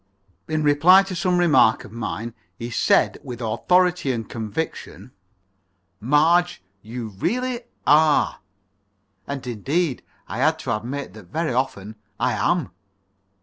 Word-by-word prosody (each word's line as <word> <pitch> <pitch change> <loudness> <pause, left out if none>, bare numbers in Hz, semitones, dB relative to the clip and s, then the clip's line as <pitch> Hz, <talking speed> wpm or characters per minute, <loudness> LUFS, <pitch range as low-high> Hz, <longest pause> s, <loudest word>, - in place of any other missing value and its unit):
In 155 0 -1
reply 160 +7 +6
to 190 -1 -6
some 180 +1 +1
remark 150 -10 +4
of - - -12
mine, 115 0 -5 0.2
he 120 +1 -6
said - - +2
with 120 -2 -7
authority 175 +8 +1
and 115 -4 -4
conviction: 120 +3 -5 0.9
"Marge, 155 - +2 0.2
you 115 +2 -6
really 245 - -2 0.2
are." 155 0 +4 0.9
And, 140 -2 -5
indeed, 135 - -1 0.3
I 115 - -5
had 155 +4 +2
to 130 -7 -2
admit 125 +1 -5
that 105 -4 -13
very 155 - -2
often 110 -5 -3 0.2
I - - +1
am. - - 0
140 Hz, 125 wpm, -22 LUFS, 115-170 Hz, 0.9 s, reply